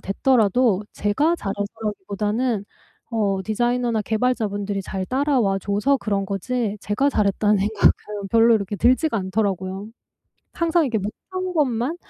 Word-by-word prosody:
됐더라도 215 -1 +2
제가 290 +12 +1
잘해서라기보다는 210 - -2 0.5
어 205 -4 0
디자이너나 240 +1 0
개발자분들이 210 -3 -1
잘 190 0 -4
따라와 255 -7 +1
줘서 205 +8 +1
그런 200 -5 -2
거지 210 +2 -2
제가 270 +8 +1
'잘했다.'는 205 -2 +2
생각은 205 0 +1
별로 230 0 +5
이렇게 205 -1 -1
들지가 255 - +2
않더라고요. 190 0 -2 0.7
항상 335 -1 +2
이렇게 230 -3 0
못한 370 - -5
것만 270 0 0
215 Hz, 330 characters per minute, -22 LUFS, 200-250 Hz, 0.7 s, 별로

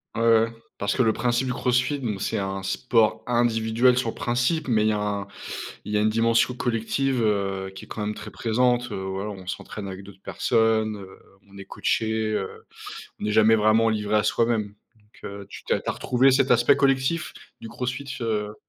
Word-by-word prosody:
Ouais, 115 - -1
ouais, 115 0 +4 0.2
parce 100 0 -1
que - - +2
le 115 -3 +4
principe 120 +3 0
du 125 - -1
CrossFit 125 +3 +1
donc 105 -7 -3
c'est - - -1
un 95 -1 -3
sport 110 +3 +1
individuel 120 +1 +2
sur 125 -2 0
le - - -6
principe 125 +7 0
mais 110 -4 +2
il 110 - +3
y - - +3
a 105 - -1
un 100 -1 -2 0.6
il 105 - -5
y - - +3
a - - +2
une 110 - +3
dimension 115 +2 +2
collective, 125 +2 -1
heu, 95 -2 -1
qui 95 - -10
est - - -25
quand 110 - -6
même 105 - -2
très 105 0 -9
présente, 120 +2 0
heu, - - -3
voilà, 95 +2 -4
on 95 -2 -10
s'entraîne 100 +2 -6
avec 95 0 -7
d'autres 95 -1 -14
personnes, 110 -1 +1
heu, 95 -1 -12 0.3
on 100 - -14
est 100 - -8
coachés, 110 +2 -1
heu, 95 -2 -4 0.6
on - - -2
est 105 - 0
jamais 110 +1 +5
vraiment 110 +1 +4
livré 105 -1 0
à 105 - +3
soi-même, 110 -1 0 0.2
donc 105 0 -24
heu, 100 0 -7
tu - - -9
t'es - - +1
tu - - -9
as - - -1
retrouvé 130 +2 +3
cet 135 0 +2
aspect 120 +3 +5
collectif 135 +3 +1 0.3
du 115 - -8
CrossFit, 125 +4 -4
heu? 105 -2 -2
110 Hz, 210 wpm, -24 LUFS, 105-120 Hz, 0.6 s, jamais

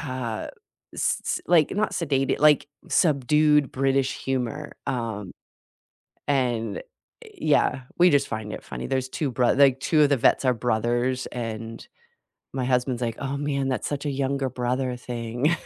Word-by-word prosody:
uh, 120 -4 -4 0.5
s - - 0
s - - -1
like, 165 -2 +4
not 215 - +1
sedated 135 -5 0
like, 150 -1 +4 0.2
subdued 150 -1 +3
British 135 0 +1
humor, 135 +3 -3
um, 115 -7 -3 1.0
and 120 -6 0 0.6
yeah, 130 - +2 0.2
we, 180 +1 +7
just, 145 -1 +2
find 110 -1 -5
it - - -6
funny. 60 - -6
There's 130 -1 -1
2 140 0 -2
broth 125 +2 +2
like, 135 -2 +5
2 155 0 +3
of 145 - +5
the 140 - +4
vets 125 - +3
are 125 -1 +3
brothers, 120 +2 0
and 115 -1 -5 0.7
my 130 -1 -2
husband's 125 -1 0
like, 115 -1 -2
"Oh 140 0 -3
man, 140 -2 -1
that's 130 -5 -2
such 145 0 -4
a - - 0
younger 135 0 -1
brother 125 +1 -2
thing." 120 +4 -1
130 Hz, 155 wpm, -25 LUFS, 120-140 Hz, 1.0 s, we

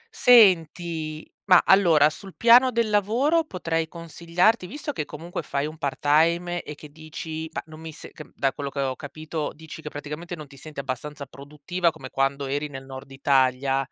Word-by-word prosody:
Senti, 170 -8 +3 0.2
ma 185 -3 +6
allora, 170 -7 +5
sul 190 +4 -11
piano 240 +3 +6
del 230 -2 0
lavoro, 255 - +2
potrei 165 - -2
consigliarti 170 +5 0
visto 295 - -5
che 150 - -4
comunque 165 +3 -7
fai 140 -1 -2
un 155 +1 -8
part-time 165 +5 +1
e 150 - -9
che 150 0 -13
dici: 160 +1 -7
"Mah, - - -5
non 155 0 -13
mi 160 0 -8
se", - - -12
c - - -11
uhm, - - -22
da 135 -1 0
quello 140 -1 -5
che 140 - -6
ho 130 -1 -1
capito, 155 +2 -5
dici 160 0 -11
che 150 - -7
praticamente 150 +4 -7
non 155 -2 -9
ti 140 0 -17
senti 150 0 -10
abbastanza 140 +2 -5
produttiva 150 +6 -3
come 155 -5 -10
quando 135 +1 0
eri 145 +2 -2
nel 135 -2 -9
nord 135 +1 -10
Italia, 135 0 +1
155 Hz, 185 wpm, -24 LUFS, 145-175 Hz, 0.2 s, ma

